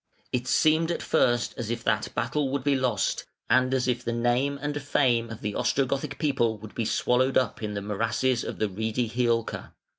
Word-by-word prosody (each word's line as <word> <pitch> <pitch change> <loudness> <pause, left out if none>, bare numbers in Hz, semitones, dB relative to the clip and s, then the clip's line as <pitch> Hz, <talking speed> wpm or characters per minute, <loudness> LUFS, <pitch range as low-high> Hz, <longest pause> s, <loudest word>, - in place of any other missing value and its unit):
] - - -35
It 125 0 -1
seemed 160 +4 +3
at 170 - -2
first 120 -1 +2
as 115 -2 -3
if 120 0 -3
that 105 0 0
battle 135 +4 0
would 135 -1 -2
be 145 0 +2
lost, 125 -7 0 0.2
and 130 0 +4
as 130 -1 +1
if 125 -1 0
the 120 - -2
name 120 +4 +1
and 145 +1 -3
fame 125 -4 +2
of 110 - -8
the 105 0 -2
Ostrogothic 140 +4 0
people 125 -7 +1
would 110 +1 -11
be 115 - -2
swallowed 130 +4 +2
up 130 - 0
in 105 -1 -3
the 100 - -3
morasses 115 +4 0
of - - -5
the 110 - +1
reedy 110 +4 -2
Hiulca. 115 -1 -1
125 Hz, 205 wpm, -27 LUFS, 115-135 Hz, 0.2 s, and